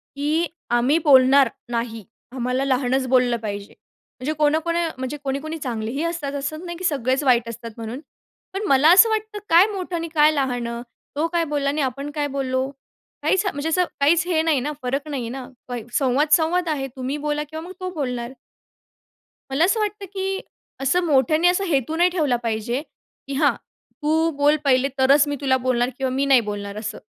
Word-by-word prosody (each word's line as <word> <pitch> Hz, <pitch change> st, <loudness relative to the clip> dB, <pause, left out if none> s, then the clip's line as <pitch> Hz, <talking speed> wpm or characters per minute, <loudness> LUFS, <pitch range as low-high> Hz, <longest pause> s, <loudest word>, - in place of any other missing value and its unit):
की 305 Hz, +4 st, 0 dB, 0.2 s
आम्ही 240 Hz, +6 st, +3 dB
बोलणार 265 Hz, -2 st, +6 dB, 0.2 s
नाही, 230 Hz, -2 st, -3 dB, 0.3 s
आम्हाला 255 Hz, +1 st, -1 dB
लहानच 260 Hz, 0 st, +1 dB
बोललं 250 Hz, -2 st, +3 dB
पाहिजे. 200 Hz, -1 st, -5 dB, 0.5 s
म्हणजे 275 Hz, +5 st, -2 dB
कोणकोण 315 Hz, +3 st, +1 dB, 0.2 s
म्हणजे 260 Hz, +3 st, -4 dB
कोणी, 275 Hz, 0 st, -1 dB
कोणी 315 Hz, +2 st, -5 dB
चांगलेही 245 Hz, 0 st, -3 dB
असतात 335 Hz, -4 st, -3 dB
असं 310 Hz, +5 st, -4 dB
नाही 345 Hz, -1 st, -6 dB
की 370 Hz, -, -9 dB
सगळेच 270 Hz, -4 st, 0 dB
वाईट 240 Hz, -4 st, +3 dB
असतात 230 Hz, 0 st, -7 dB
म्हणून, 230 Hz, +3 st, -6 dB, 0.5 s
पण 390 Hz, +2 st, -3 dB
मला 275 Hz, +3 st, +5 dB
असं 450 Hz, +5 st, +7 dB
वाटतं 435 Hz, -1 st, -2 dB
काय 340 Hz, +3 st, +7 dB
मोठं 365 Hz, -2 st, -4 dB
आणि 335 Hz, 0 st, -3 dB
काय 300 Hz, 0 st, +6 dB
लहान? 255 Hz, -5 st, -1 dB, 0.5 s
तो 310 Hz, +3 st, +1 dB
काय 335 Hz, 0 st, 0 dB
बोलला 280 Hz, -1 st, +1 dB
आणि 295 Hz, +1 st, -1 dB
आपण 275 Hz, +2 st, -3 dB
काय 295 Hz, -1 st, 0 dB
बोललो? 260 Hz, -1 st, -1 dB, 0.5 s
काहीच 380 Hz, +1 st, +1 dB
म्हणजे 315 Hz, -5 st, -2 dB
असं 360 Hz, +2 st, +2 dB
काहीच 330 Hz, +5 st, +3 dB
हे 330 Hz, -3 st, +2 dB
नाही 320 Hz, -4 st, +2 dB
ना, 285 Hz, +4 st, -3 dB
फरक 275 Hz, +4 st, -2 dB
नाहीये 255 Hz, -6 st, -3 dB
ना 255 Hz, 0 st, -6 dB, 0.5 s
संवाद, 275 Hz, +2 st, +2 dB
संवाद 335 Hz, +3 st, +3 dB
आहे. 275 Hz, -3 st, -1 dB
तुम्ही 260 Hz, +2 st, -3 dB
बोला 295 Hz, 0 st, 0 dB
किंवा 315 Hz, 0 st, -6 dB
मग -, -, -9 dB
तो 370 Hz, 0 st, -3 dB
बोलणार. 250 Hz, -5 st, -3 dB, 1.2 s
मला 275 Hz, +5 st, +3 dB
असं 420 Hz, +5 st, +1 dB
वाटतं 420 Hz, -1 st, -2 dB
की 385 Hz, 0 st, -2 dB, 0.4 s
असं 350 Hz, +7 st, +2 dB
मोठ्याने 310 Hz, +3 st, +3 dB
असा 360 Hz, +2 st, +2 dB
हेतू 290 Hz, -1 st, 0 dB
नाही 350 Hz, +1 st, +4 dB
ठेवला 310 Hz, -8 st, +1 dB
पाहिजे, 230 Hz, +4 st, -1 dB, 0.5 s
की 275 Hz, -, -4 dB
"हां, 290 Hz, +1 st, +3 dB, 0.5 s
तू 320 Hz, +2 st, +2 dB
बोल 290 Hz, +1 st, +4 dB
पहिले 265 Hz, 0 st, +4 dB
तरच 280 Hz, +3 st, +5 dB
मी 290 Hz, -, -1 dB
तुला 265 Hz, -2 st, +2 dB
बोलणार 245 Hz, -1 st, +2 dB
किंवा 265 Hz, -1 st, -1 dB
मी 275 Hz, +2 st, +1 dB
नाही 270 Hz, -3 st, +5 dB
बोलणार" 205 Hz, -1 st, -5 dB
असं. 215 Hz, 0 st, -5 dB
280 Hz, 180 wpm, -22 LUFS, 255-320 Hz, 1.2 s, असं